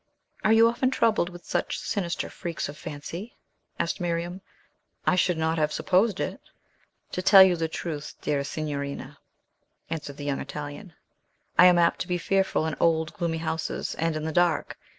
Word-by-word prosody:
"Are 215 - +4
you 225 +1 +7
often 240 +2 +1
troubled 225 -8 +2
with 175 -1 -12
such - - -1
sinister 175 -4 -2
freaks 170 -2 -4
of 145 - -8
fancy?" 165 +8 -7 0.4
asked 170 - -2
Miriam. 175 +2 -2 0.6
"I - - +4
should 180 -1 +2
not 160 0 0
have 150 0 +1
supposed 195 +4 +2
it." - - -3 0.7
"To 185 - -2
tell 190 +1 +9
you 185 -2 +4
the 165 -1 -1
truth, 155 -2 -5
dearest 145 -1 -1
signorina," 140 -2 -4 0.7
answered 150 -3 -5
the 145 - -6
young 140 -1 -1
Italian, 145 +6 -7 0.6
"I 180 +3 +8
am 180 -1 +6
apt 170 -1 +3
to - - -3
be 180 -1 0
fearful 190 -2 +1
in 160 - -2
old, 160 -1 +2
gloomy 170 -2 -2
houses, 160 0 -3
and 165 0 -1
in 155 - -3
the 160 - -1
dark. 175 -1 +1
165 Hz, 170 wpm, -26 LUFS, 155-180 Hz, 0.7 s, tell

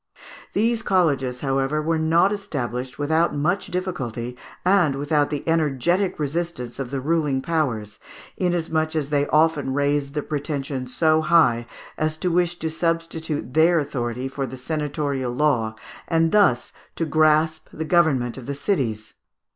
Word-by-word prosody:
These 230 +2 +1
colleges, 140 - +1
however, 135 +2 0
were 160 +1 0
not 165 +5 +3
established 125 - -4
without 160 +2 +1
much 170 +7 0
difficulty 130 - -4 0.3
and 180 -7 +4
without 145 +1 +1
the 145 0 -4
energetic 165 +4 +1
resistance 150 -4 -3
of 135 -3 -3
the 135 +1 -3
ruling 150 -1 +1
powers, 125 -10 -2 0.4
inasmuch 165 -3 0
as 150 -2 -2
they 145 -1 +2
often 150 -4 +2
raised 145 0 0
their 150 - -1
pretensions 140 -3 -4
so 155 -1 +3
high 155 -8 +3 0.3
as 155 0 0
to 180 +2 -1
wish 175 0 +1
to 160 - -3
substitute 165 -4 -2
their 165 +2 +5
authority 125 -4 -2
for 135 0 -4
the 130 +2 -8
senatorial 140 -2 -2
law, 120 -6 +1 0.3
and 165 0 +2
thus 195 - +3 0.2
to 165 - -1
grasp 155 +1 +2
the 160 - -5
government 150 -8 +2
of 120 - -11
the 140 - -3
cities. 120 - -2
150 Hz, 145 wpm, -23 LUFS, 135-165 Hz, 0.4 s, their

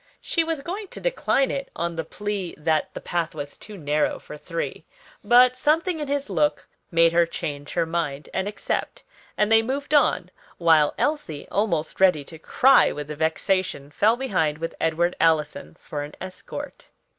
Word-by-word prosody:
She 335 - 0
was 325 -3 -2
going 385 +7 -5
to - - -8
decline - - +1
it 275 -1 -4
on 170 0 -2
the 165 - -2
plea 205 -3 -4
that 155 0 0
the - - -4
path 170 -2 -2
was 145 -1 -6
too 210 -1 -10
narrow 150 -2 0
for - - -10
three, 165 +2 -5 0.4
but 250 +1 +6
something 320 +6 +1
in 295 - -3
his 285 0 -1
look 150 -6 0 0.2
made 165 0 +4
her 170 0 +4
change 145 -3 -5
her 170 -1 +1
mind 160 -4 -3
and 190 - -1
accept; 210 - -3 0.3
and 210 +1 +2
they 225 0 +7
moved 275 +5 -3
on, 295 - +3 0.3
while 160 -3 +4
Elsie, 290 - -2
almost 170 -7 -1
ready 180 -6 +4
to 160 +3 -12
cry 265 +10 +5
with 150 0 -6
vexation, 160 0 -1
fell 215 +8 +3
behind 170 - 0
with 165 +1 -4
Edward 170 +2 +1
Allison 150 - +1
for 145 - -5
an 145 +1 -7
escort. 185 0 -8
170 Hz, 170 wpm, -24 LUFS, 155-245 Hz, 0.4 s, they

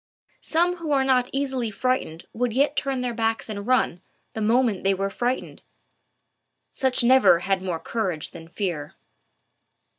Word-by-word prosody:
Some 350 +2 +1
who 325 -3 -4
are 270 -1 +3
not 255 -2 +2
easily 265 -4 -1
frightened 215 -7 -2
would 240 0 -1
yet 280 +4 +2
turn 270 -2 -1
their 245 -1 -2
backs 225 -1 -1
and 200 0 -5
run, 250 -8 +1 0.3
the 220 - -4
moment 225 -2 +2
they 195 0 +3
were 195 +1 -2
frightened: 245 +5 -3 1.1
such 260 -3 +1
never 245 -8 +6
had 195 0 0
more 180 -3 -3
courage 180 -4 -3
than 165 -1 -11
fear. 170 -5 -4
235 Hz, 150 wpm, -24 LUFS, 195-260 Hz, 1.1 s, never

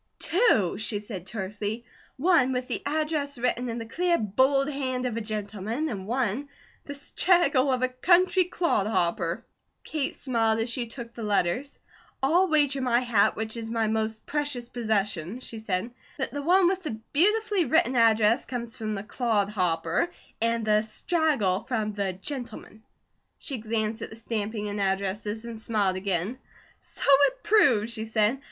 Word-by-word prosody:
"Two," 320 - +2
she 215 -1 0
said 200 -4 -8
tersely. 210 +3 -4 0.3
"One, 285 -4 +3
with 250 0 -2
the - - -3
address 300 -2 -1
written 250 0 -1
in 230 - -3
the 230 - -5
clear, 345 +8 +1
bold 265 +7 +2
hand 260 -3 -2
of 245 -3 -2
a 230 - -2
gentleman, 215 +6 -3
and 195 -4 -5
one, 250 +3 -1 0.4
the 285 - -6
straggle 290 -2 +2
of 255 0 0
a - - +4
country 360 +8 +3
clod 335 - 0
hopper." 170 -4 0 0.4
Kate 300 -3 -3
smiled 225 -4 +1
as 225 +1 0
she 240 0 -2
took 235 0 -8
the 235 - -8
letters: 210 +5 0 0.5
"I'll 345 +7 +4
wager 290 -4 +2
my 245 -1 +2
hat, 235 -5 +3
which 220 +1 -3
is 225 -1 -5
my 225 -1 0
most 220 0 -2
precious 290 -5 -2
possession," 210 -4 -1
she 230 -3 -7
said, 210 +1 -2 0.3
"that 265 -4 -2
the 285 - -3
one 360 +5 +4
with 375 +1 0
the 300 -11 -4 0.2
beautifully 415 +3 +3
written 260 -2 +2
address 225 0 +4
comes 235 -2 -5
from 215 -1 -3
the 195 - -5
'clod 215 -3 0
hopper,' 170 -4 0 0.3
and 230 -1 +1
the 215 0 +4
'straggle' 220 - +1
from 220 -3 -2
the 200 -2 -1
'gentleman.'" 235 +1 -7 0.6
She 275 -6 -5
glanced 220 0 -2
at - - -5
the - - -10
stamping 220 -1 -3
and 205 0 -3
addresses 200 +3 -1
and 230 -2 -7
smiled 210 -4 0
again: 190 +5 -1 0.4
"So - - -9
it 285 - +4
proves," 240 - +4
she 220 -1 -3
said. 220 +3 +1
230 Hz, 165 wpm, -27 LUFS, 210-275 Hz, 0.6 s, a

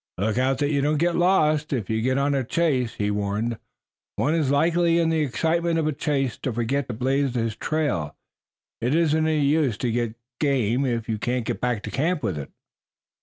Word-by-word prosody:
"Look 110 +5 0
out 130 +1 +1
that 145 +2 0
you 140 -2 +1
don't 150 +2 +1
get 170 +2 +1
lost 155 -4 +2
if 120 -9 -1
you 110 0 -1
get 130 +3 +1
on 140 +1 +1
a 135 -1 +1
chase," 130 -4 0
he 105 -2 -1
warned. 105 +3 -2 0.6
"One 150 - +1
is 155 -5 +1
likely 165 +4 +3
in 165 -1 +2
the 160 -1 +1
excitement 165 +4 0
of 160 - +1
a 155 - 0
chase 135 -4 -1
to 130 - -2
forget 120 +4 -1
to 120 - -4
blaze 135 +2 0
his 115 -2 -1
trail. 140 - -1 0.7
It 125 +6 +1
isn't 160 -1 +2
any 155 -2 +2
use 140 -6 +2
to 125 - -1
get 115 -1 -1 0.2
game 135 -2 +1
if 115 -2 -2
you 110 -2 -2
can't 120 +1 -1
get - - -3
back 120 -4 -1
to - - -5
camp 155 +2 0
with 90 -9 -1
it." 70 - -7
135 Hz, 210 wpm, -24 LUFS, 115-155 Hz, 0.7 s, likely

